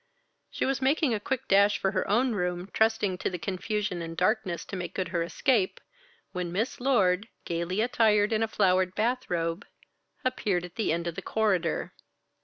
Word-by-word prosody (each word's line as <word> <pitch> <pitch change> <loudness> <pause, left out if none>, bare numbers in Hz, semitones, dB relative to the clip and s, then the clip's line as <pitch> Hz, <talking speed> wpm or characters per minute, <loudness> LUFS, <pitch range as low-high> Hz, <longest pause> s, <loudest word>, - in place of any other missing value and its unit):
She - - -2
was 270 0 0
making 275 0 +2
a 215 - 0
quick 260 +4 -3
dash 200 +1 +5
for 195 - 0
her 190 -1 -1
own 240 +5 +3
room, 180 -1 -2
trusting 220 -4 +1
to - - -1
the 180 - -4
confusion 185 +1 -2
and 165 0 -6
darkness 190 -2 0
to - - -6
make 180 -1 -5
good 185 -2 -2
her 170 -1 -1
escape, 195 - +1 0.5
when 180 -2 -3
Miss 215 +8 -2
Lord, 210 -6 +2 0.2
gaily 170 +4 -1
attired 220 -3 +3
in 220 - +1
a 225 - +2
flowered 185 -2 +2
bath 245 +4 0
robe, 165 +1 -1 0.6
appeared 200 -8 0
at 175 - -11
the 220 - 0
end 170 +1 -1
of 170 - -2
the - - -6
corridor. 190 -7 0
195 Hz, 185 wpm, -28 LUFS, 180-220 Hz, 0.6 s, dash